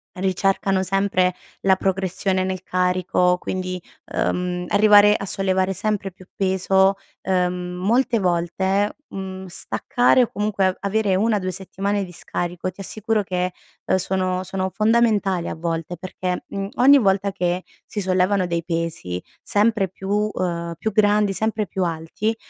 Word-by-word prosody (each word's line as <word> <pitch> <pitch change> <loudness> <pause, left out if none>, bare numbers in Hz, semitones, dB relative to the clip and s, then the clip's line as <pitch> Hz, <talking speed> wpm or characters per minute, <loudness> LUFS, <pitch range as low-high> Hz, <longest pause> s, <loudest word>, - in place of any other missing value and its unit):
ricercano 190 0 +1
sempre 190 -1 +1 0.3
la 190 -1 +4
progressione 190 0 0
nel 185 -1 -3
carico 180 -1 +1
quindi, 185 -1 -4 0.3
uhm, 180 0 -1
arrivare 210 0 +6
a 200 - -3
sollevare 190 0 +1
sempre 205 -2 -2
più 185 +1 -17
peso, 190 0 +2 0.3
ehm, 180 -1 0
molte 230 +5 +2
volte, 190 +3 0
mhmm, 190 -1 -7
staccare 245 +7 +2
o 240 - +2
comunque 205 -2 0
a 185 - 0
avere 200 -1 +1
1 215 +2 +2
o - - -1
2 185 -1 -3
settimane 195 +2 -2
di 180 - -12
scarico 175 +1 -4
ti 185 - -14
assicuro 215 +2 -1
che, 180 -1 -2 0.3
ehm, - - +2
sono 185 0 0
sono 190 0 -2
fondamentali 215 -4 +2
a - - -4
volte 165 +1 -3
perché, 180 +1 -4
mhmm, 195 0 -4
ogni 275 +2 +7
volta 195 -1 +2
che 180 -1 -1 0.2
si 210 - -4
sollevano 185 0 +2
dei 170 -1 -2
pesi 165 - -3 0.2
sempre 210 -2 +2
più 205 +3 -1
ehm, 170 -2 -3
più 220 - -2
grandi, 205 -1 +3
sempre 220 +1 0
più 190 +1 -2
alti 170 +6 -2
190 Hz, 145 wpm, -22 LUFS, 180-205 Hz, 0.3 s, ogni